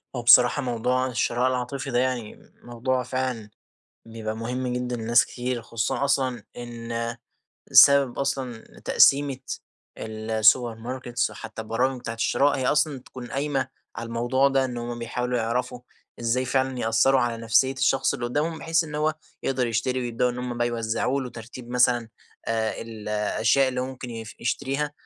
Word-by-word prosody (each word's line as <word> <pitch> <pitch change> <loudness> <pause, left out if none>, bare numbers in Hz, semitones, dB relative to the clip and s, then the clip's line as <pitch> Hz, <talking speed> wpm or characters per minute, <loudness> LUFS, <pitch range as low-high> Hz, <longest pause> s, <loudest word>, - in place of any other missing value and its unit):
هو 120 - -2
بصراحة، 120 +3 +7
موضوع 125 +1 0
الشراء 125 0 0
العاطفي 130 +2 -3
ده 120 - +2
يعني 125 -4 -3
موضوع 125 +2 -1
فعلًا 125 -3 -3 0.6
بيبقى 110 -1 -5
مهم 125 +3 -3
جدًا 125 0 -2
لناس 120 +1 +3
كتير، 125 -1 -4
خصوصًا 115 +4 -1
أصلًا 130 -5 0
إن 115 -1 -4 0.6
بسبب 140 -3 +7
أصلًا 130 -4 -3
تقسيمة 140 -1 +4 0.6
ال 110 0 -6
السوبر 110 +2 +4
ماركتس، 120 +1 -3
وحتى 110 - -8
البرامج 125 +4 -1
بتاعة 115 -2 -5
الشراء، 135 +5 +2
هي 130 -1 -1
أصلًا 150 -1 +2
تكون 125 -1 -10
قايمة 135 -1 -1 0.3
على 115 - -5
الموضوع 120 +4 +2
ده، 135 -1 +2
إن 125 -2 -4
همّ 120 0 -5
بيحاولوا 125 +1 -2
يعرفوا 125 +2 -2 0.4
إزاي 120 +2 +1
فعلًا 130 0 0
يأثروا 115 +4 +3
على 120 -1 0
نفسية 125 +4 +3
الشخص 135 0 +1
اللي 120 - -3
قدامهم 150 +6 -1
بحيث 165 +1 +1
إن 150 -2 -9
هو 155 +1 +1 0.3
يقدر 130 -2 0
يشتري، 120 +3 -1
ويبدؤوا 120 0 0
إن 120 - -6
همّ 125 -1 -4
بقى 120 - +2
يوزعوا 120 +3 -1
له 125 -2 -5
ترتيب 120 +1 -10
مثلًا 125 -2 +3 0.4
آآ 110 -1 -1
ال 110 -2 -8
الأشياء 110 +5 +2
اللي 125 -1 -2
مُمكن 130 -1 -6 0.3
يشتريها 140 +4 -1
125 Hz, 155 wpm, -25 LUFS, 115-130 Hz, 0.6 s, بصراحة